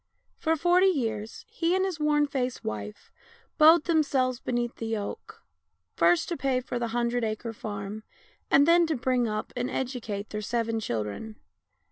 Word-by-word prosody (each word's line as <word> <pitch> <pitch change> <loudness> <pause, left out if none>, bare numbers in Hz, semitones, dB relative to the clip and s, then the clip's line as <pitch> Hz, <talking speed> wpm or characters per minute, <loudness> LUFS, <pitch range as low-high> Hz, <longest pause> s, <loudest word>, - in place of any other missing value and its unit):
For 320 -1 +1
forty 355 +4 +4
years 225 - -2
he 335 +2 0
and 380 0 +2
his 365 -5 -3
worn 300 -1 +3
faced 255 -3 -3
wife 105 -1 -6 0.5
bowed 315 +1 +7
themselves 275 -7 +1
beneath 240 -2 -2
the 225 - -4
yoke, 215 -2 -5 0.5
first 345 -2 +3
to 340 - -2
pay 265 -2 +1
for 250 -1 -4
the 235 - -1
hun 235 +1 0
dred 245 0 -1
acre 225 +1 -3
farm, 205 -1 -6 0.5
and 285 +2 +5
then 340 0 +5
to 315 - 0
bring 250 -1 +1
up 215 0 -4
and 245 0 -2
educate 230 -6 -4
their 210 - -3
seven 230 +1 -1
children. 115 - -4
245 Hz, 165 wpm, -27 LUFS, 220-300 Hz, 0.5 s, bowed